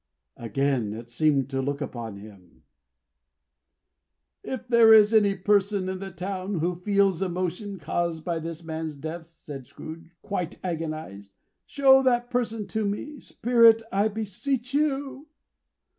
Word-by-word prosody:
Again 120 -1 -1
it 115 +2 -9
seemed 140 0 +2
to 135 0 -1
look 140 +1 -2
upon 120 -6 -5
him. 100 -4 -15 1.8
"If 255 -2 -6
there 235 -2 +6
is 215 0 +7
any 205 -3 +4
person 200 0 +1
in 190 0 -3
the 195 0 -6
town, 190 +2 -4
who 170 +3 0
feels 195 0 +1
emotion 185 +2 -3
caused 165 0 -2
by 170 -2 -1
this 165 +1 -7
man's 160 -1 -5
death," 160 +3 -7
said 145 -6 -10
Scrooge, 165 +1 -10
quite 195 -5 -3
agonized, 155 - -5 0.3
"show 270 -2 +5
that 245 -2 +1
person 225 -3 -1
to 220 -1 -1
me, 240 +9 -4
Spirit, 230 -3 +4
I 200 +2 +2
beseech 225 +5 -3
you!" 285 0 -1
185 Hz, 135 wpm, -26 LUFS, 155-220 Hz, 1.8 s, is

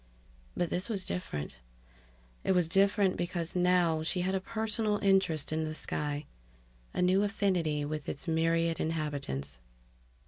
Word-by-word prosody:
But 175 - 0
this 185 +6 -1
was 200 -4 -2
different. 75 - -4 0.9
It - - +3
was 180 -3 +3
different 195 +2 +3
because 175 -1 -2
now 180 -3 +3
she 170 +3 -1
had 185 +2 0
a 190 - +1
personal 220 0 -1
interest 190 -7 +2
in 160 0 0
the 155 0 -3
sky, 150 -1 -3 0.7
a 180 - 0
new 185 +2 +4
affinity 180 -8 +1
with 150 0 -4
its 140 - -5
myriad 165 0 +2
inhabitants. 140 - -3
175 Hz, 140 wpm, -31 LUFS, 155-190 Hz, 0.9 s, new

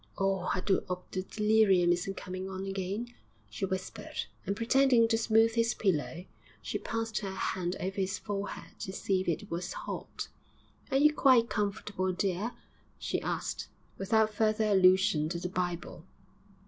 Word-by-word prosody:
'Oh, 195 -2 0
I 185 - 0
do 190 0 +1
'ope 180 0 -5
the 185 - -1
delirium 210 -3 +3
isn't 195 +3 -3
coming 185 0 -5
on 190 0 -5
again,' 195 +5 -3 0.4
she 150 - -2
whispered, 190 0 -4 0.2
and, 200 - 0
pretending 240 +1 +4
to 225 - +3
smooth 225 0 +4
his 230 0 +2
pillow, 175 -2 -1 0.3
she - - -3
passed 225 -1 -2
her 200 - -4
hand 180 -1 -1
over 190 +2 -3
his 190 0 0
forehead 200 +1 -5
to 190 - -4
see 190 -1 0
if - - -6
it 200 +5 -2
was 175 +2 -3
hot. - - -5 0.6
'Are 270 - +2
you 300 +2 +5
quite 255 -6 +5
comfortable, 200 -2 -1
dear?' 195 +5 -1 0.4
she - - -2
asked, - - -3 0.3
without 215 +2 +2
further 215 0 +2
allusion 185 -5 +4
to 170 0 -3
the 180 - -3
Bible. 175 -1 -3
195 Hz, 160 wpm, -31 LUFS, 185-220 Hz, 0.6 s, you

